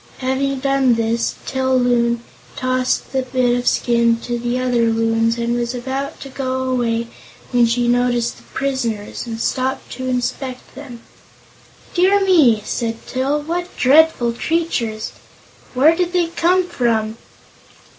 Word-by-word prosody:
Having 265 Hz, +1 st, -1 dB
done 275 Hz, -3 st, +3 dB
this, 230 Hz, +1 st, 0 dB
Til 260 Hz, -1 st, +1 dB
Loon 235 Hz, -1 st, +1 dB, 0.3 s
tossed 255 Hz, 0 st, -1 dB
the 265 Hz, -1 st, 0 dB
bit 255 Hz, -1 st, +1 dB
of 245 Hz, 0 st, -2 dB
skin 235 Hz, -1 st, +2 dB
to 240 Hz, 0 st, -3 dB
the 240 Hz, +1 st, -1 dB
other 245 Hz, -2 st, +1 dB
Loons 225 Hz, 0 st, +1 dB
and 235 Hz, 0 st, -1 dB
was 240 Hz, +1 st, -2 dB
about 265 Hz, +3 st, -4 dB
to -, -, -7 dB
go 260 Hz, -1 st, -3 dB
away 240 Hz, -3 st, 0 dB, 0.5 s
when 240 Hz, -2 st, +4 dB
she 240 Hz, +1 st, +1 dB
noticed 245 Hz, -1 st, +1 dB
the -, -, -17 dB
prisoners 240 Hz, -6 st, -2 dB
and 225 Hz, -1 st, -5 dB
stopped 260 Hz, +3 st, -2 dB
to 260 Hz, 0 st, -5 dB
inspect 255 Hz, +1 st, -3 dB
them. 255 Hz, -4 st, -10 dB, 0.9 s
"Dear 380 Hz, +3 st, +4 dB
me!" 270 Hz, -, +4 dB
said 230 Hz, -1 st, -3 dB
Til; 275 Hz, +3 st, -1 dB
"what 350 Hz, +3 st, -4 dB
dreadful 270 Hz, -3 st, +4 dB
creatures. 235 Hz, -7 st, -2 dB, 0.6 s
Where 300 Hz, +6 st, +5 dB
did 355 Hz, 0 st, -1 dB
they 345 Hz, -2 st, +1 dB
come 350 Hz, +2 st, +2 dB
from?" 225 Hz, -6 st, -1 dB
250 Hz, 140 wpm, -19 LUFS, 235-275 Hz, 0.9 s, Where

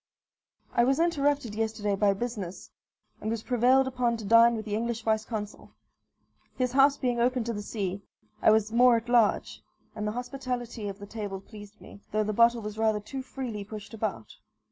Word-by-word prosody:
I 240 Hz, -, +4 dB
was 270 Hz, +4 st, +2 dB
interrupted 290 Hz, -8 st, +1 dB
yesterday 215 Hz, -2 st, -1 dB
by 200 Hz, 0 st, +3 dB
business, 200 Hz, -4 st, -5 dB, 0.5 s
and 215 Hz, -, -3 dB
was 225 Hz, -1 st, -3 dB
prevailed 255 Hz, +2 st, +3 dB
upon 245 Hz, -3 st, 0 dB
to 220 Hz, -, -8 dB
dine 230 Hz, +2 st, +6 dB
with 215 Hz, -1 st, -5 dB
the 210 Hz, -, -4 dB
English 230 Hz, +1 st, -2 dB
vice 220 Hz, -1 st, +1 dB
consul. 210 Hz, -3 st, -7 dB, 0.8 s
His 250 Hz, -1 st, 0 dB
house 275 Hz, +2 st, +5 dB
being 245 Hz, -2 st, -1 dB
open 250 Hz, 0 st, +2 dB
to 235 Hz, +1 st, -3 dB
the 205 Hz, -, -4 dB
sea, 200 Hz, -2 st, -4 dB, 0.4 s
I -, -, +5 dB
was 220 Hz, 0 st, +3 dB
more 240 Hz, 0 st, +5 dB
at 230 Hz, +1 st, -6 dB
large; 235 Hz, -4 st, +2 dB, 0.3 s
and 210 Hz, -1 st, -3 dB
the 210 Hz, -, -2 dB
hospitality 245 Hz, -3 st, -4 dB
of 195 Hz, -1 st, -5 dB
the 205 Hz, -, -9 dB
table 205 Hz, -2 st, -5 dB
pleased 205 Hz, +1 st, -13 dB
me, 200 Hz, -, -14 dB
though 215 Hz, +1 st, +1 dB
the 215 Hz, 0 st, -2 dB
bottle 235 Hz, +1 st, +4 dB
was 210 Hz, +1 st, -6 dB
rather 220 Hz, -1 st, +2 dB
too 260 Hz, +6 st, -6 dB
freely 255 Hz, -5 st, -6 dB
pushed 210 Hz, +1 st, -9 dB
about. 210 Hz, -, -4 dB
225 Hz, 190 wpm, -28 LUFS, 210-245 Hz, 0.8 s, dine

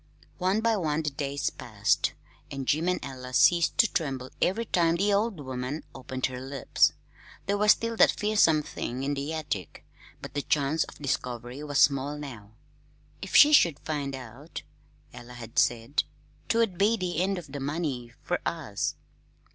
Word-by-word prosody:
One 190 Hz, +4 st, +1 dB
by 225 Hz, -1 st, +2 dB
one 160 Hz, -3 st, -1 dB
the 150 Hz, -, -1 dB
days 140 Hz, 0 st, -2 dB
passed, -, -, 0 dB, 0.4 s
and 135 Hz, -2 st, -5 dB
Jim 160 Hz, +4 st, +2 dB
and 180 Hz, -, 0 dB
Ella 130 Hz, -1 st, -8 dB
ceased 170 Hz, +3 st, +4 dB
to 230 Hz, -, +6 dB
tremble 135 Hz, -5 st, -2 dB
every 220 Hz, +6 st, +1 dB
time 170 Hz, -5 st, +2 dB
the 200 Hz, +4 st, +2 dB
old 205 Hz, -2 st, 0 dB
woman 130 Hz, +2 st, -4 dB
opened 130 Hz, -1 st, -4 dB
her 130 Hz, -1 st, -4 dB
lips. 135 Hz, 0 st, +2 dB, 0.5 s
There 200 Hz, -, +1 dB
was 210 Hz, 0 st, +7 dB
still 230 Hz, 0 st, -4 dB
that -, -, +7 dB
fearsome 205 Hz, -8 st, +3 dB
thing 130 Hz, -2 st, -5 dB
in 140 Hz, +1 st, 0 dB
the 140 Hz, +2 st, -3 dB
attic, 150 Hz, -, -5 dB, 0.3 s
but -, -, -9 dB
the 145 Hz, -, -1 dB
chance 145 Hz, +2 st, +1 dB
of -, -, -13 dB
discovery 125 Hz, -1 st, -3 dB
was 145 Hz, -2 st, -2 dB
small 140 Hz, +1 st, +3 dB
now. 120 Hz, -8 st, -9 dB, 0.7 s
"If -, -, -5 dB
she 300 Hz, +1 st, +9 dB
should 170 Hz, -, +6 dB
find 145 Hz, -3 st, -3 dB
out," 130 Hz, +5 st, -9 dB, 0.5 s
Ella 120 Hz, 0 st, -11 dB
had 120 Hz, +2 st, -3 dB
said, 125 Hz, -2 st, +1 dB, 0.5 s
"'twould 225 Hz, -6 st, +1 dB
be 215 Hz, +3 st, +4 dB
the 180 Hz, -4 st, -1 dB
end 195 Hz, +1 st, 0 dB
of 160 Hz, -6 st, -8 dB
the 145 Hz, -, -5 dB
money 140 Hz, -4 st, -3 dB
fer 175 Hz, -, -1 dB
us." 145 Hz, -12 st, -2 dB
145 Hz, 170 wpm, -28 LUFS, 130-175 Hz, 0.7 s, she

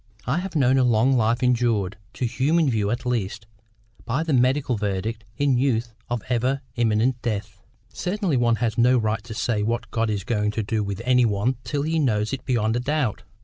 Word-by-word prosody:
I 140 Hz, +8 st, 0 dB
have 185 Hz, -1 st, -6 dB
known 135 Hz, -2 st, +4 dB
a -, -, +4 dB
long 125 Hz, +2 st, +3 dB
life 115 Hz, +2 st, +1 dB
injured, 115 Hz, -6 st, +1 dB, 0.2 s
to 125 Hz, -, -1 dB
human 145 Hz, +5 st, +2 dB
view 105 Hz, -3 st, 0 dB
at 120 Hz, +3 st, -2 dB
least, 110 Hz, -3 st, -2 dB, 0.6 s
by 130 Hz, +7 st, -1 dB
the 160 Hz, -2 st, -1 dB
medical 130 Hz, +1 st, +2 dB
verdict 105 Hz, +2 st, -3 dB
in 140 Hz, -4 st, +2 dB
youth 120 Hz, -3 st, 0 dB, 0.2 s
of 120 Hz, -3 st, -2 dB
ever 125 Hz, +3 st, 0 dB
imminent 120 Hz, +1 st, +1 dB
death." 100 Hz, -3 st, -4 dB, 0.3 s
"Certainly 180 Hz, -, -1 dB
one 120 Hz, -1 st, +3 dB
has 115 Hz, -1 st, -1 dB
no 125 Hz, +2 st, +5 dB
right 110 Hz, -2 st, -1 dB
to 115 Hz, -2 st, -8 dB
say 115 Hz, -2 st, 0 dB
what 115 Hz, +3 st, -2 dB
God 115 Hz, -1 st, 0 dB
is 100 Hz, -3 st, -2 dB
going 105 Hz, -1 st, 0 dB
to 110 Hz, -, -1 dB
do 105 Hz, +1 st, -1 dB
with 100 Hz, +2 st, -4 dB
any 125 Hz, 0 st, +4 dB
one 110 Hz, +4 st, 0 dB
till 140 Hz, +4 st, -2 dB
he 160 Hz, +2 st, 0 dB
knows 110 Hz, -5 st, +1 dB
it 130 Hz, -2 st, -4 dB
beyond 115 Hz, -3 st, +1 dB
a -, -, +1 dB
doubt. 135 Hz, -3 st, -1 dB
120 Hz, 200 wpm, -24 LUFS, 110-130 Hz, 0.6 s, no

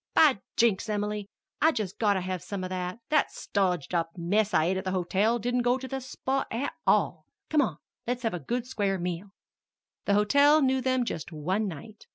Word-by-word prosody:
"By 285 Hz, -9 st, +6 dB, 0.2 s
Jinks, 225 Hz, -2 st, +2 dB
Em'ly, 210 Hz, -1 st, -2 dB, 0.3 s
I've 320 Hz, +1 st, +4 dB
just 210 Hz, -4 st, -3 dB
got 205 Hz, -3 st, +3 dB
to 190 Hz, -, 0 dB
have 185 Hz, -1 st, -3 dB
some 190 Hz, +1 st, -5 dB
of 185 Hz, -, -5 dB
that. 180 Hz, +1 st, -3 dB
That 305 Hz, 0 st, +3 dB
stodged 180 Hz, -6 st, -1 dB
up 165 Hz, -1 st, +1 dB
mess 200 Hz, +5 st, +1 dB
I 155 Hz, -, +3 dB
ate 185 Hz, +2 st, +1 dB
at 190 Hz, -, -3 dB
the 190 Hz, -, -2 dB
hotel 195 Hz, +6 st, +1 dB
didn't 245 Hz, +2 st, 0 dB
go 245 Hz, +1 st, +2 dB
to 260 Hz, 0 st, -7 dB
the 270 Hz, 0 st, -4 dB
spot 265 Hz, +1 st, -2 dB
at 245 Hz, +5 st, -2 dB
all. -, -, +2 dB, 0.2 s
Come 305 Hz, -1 st, +5 dB
on, 175 Hz, -, -1 dB, 0.3 s
let's 245 Hz, 0 st, -2 dB
have 225 Hz, -, 0 dB
a 175 Hz, -, -3 dB
good 235 Hz, -, -2 dB
square 200 Hz, -6 st, -1 dB
meal." 180 Hz, +2 st, -3 dB, 0.8 s
The 200 Hz, -, +3 dB
hotel 285 Hz, +9 st, +5 dB
knew 265 Hz, 0 st, +2 dB
them 255 Hz, -1 st, +1 dB
just 175 Hz, -6 st, -5 dB
one 185 Hz, +7 st, -1 dB
night. 205 Hz, +5 st, -9 dB
210 Hz, 205 wpm, -28 LUFS, 185-250 Hz, 0.8 s, By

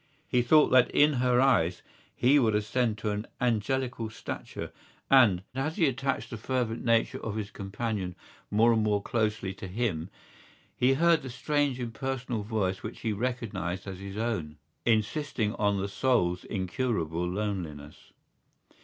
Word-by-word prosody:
He 125 Hz, -4 st, +2 dB
thought 150 Hz, +5 st, +5 dB
that 130 Hz, -1 st, +5 dB
in 150 Hz, +1 st, +4 dB
her 125 Hz, -1 st, +3 dB
eyes 90 Hz, -10 st, +3 dB, 0.3 s
he 140 Hz, +4 st, +4 dB
would 110 Hz, -5 st, +2 dB
ascend 110 Hz, +1 st, 0 dB
to 105 Hz, 0 st, -2 dB
an 105 Hz, +2 st, -3 dB
angelical 125 Hz, 0 st, 0 dB
stature; 110 Hz, -, -6 dB, 0.4 s
and, 110 Hz, -9 st, +6 dB
as 135 Hz, +5 st, -2 dB
he 170 Hz, -, +3 dB
attached 135 Hz, 0 st, -1 dB
the 120 Hz, -, -4 dB
fervent 120 Hz, 0 st, -2 dB
nature 115 Hz, -1 st, +1 dB
of 110 Hz, -2 st, -3 dB
his 105 Hz, -2 st, -4 dB
companion 100 Hz, -2 st, -4 dB, 0.3 s
more 115 Hz, +3 st, +4 dB
and 110 Hz, -, +2 dB
more 105 Hz, -1 st, +1 dB
closely 110 Hz, -4 st, -1 dB
to 95 Hz, -, -8 dB
him, 95 Hz, -4 st, -2 dB, 0.7 s
he 130 Hz, +2 st, +3 dB
heard 165 Hz, +1 st, +4 dB
the 130 Hz, -, -7 dB
strange 145 Hz, +1 st, 0 dB
impersonal 125 Hz, -1 st, -3 dB
voice 100 Hz, -3 st, -1 dB
which 110 Hz, -, -7 dB
he 110 Hz, -, -1 dB
recognised 105 Hz, -6 st, -3 dB
as 95 Hz, -1 st, -6 dB
his 100 Hz, +1 st, -7 dB
own, 100 Hz, -10 st, -2 dB, 0.3 s
insisting 110 Hz, 0 st, +1 dB
on 100 Hz, -2 st, +1 dB
the 100 Hz, -, -1 dB
soul's 95 Hz, -6 st, +1 dB
incurable 90 Hz, -4 st, -2 dB
loneliness. 90 Hz, -7 st, -5 dB
110 Hz, 150 wpm, -29 LUFS, 100-125 Hz, 0.7 s, and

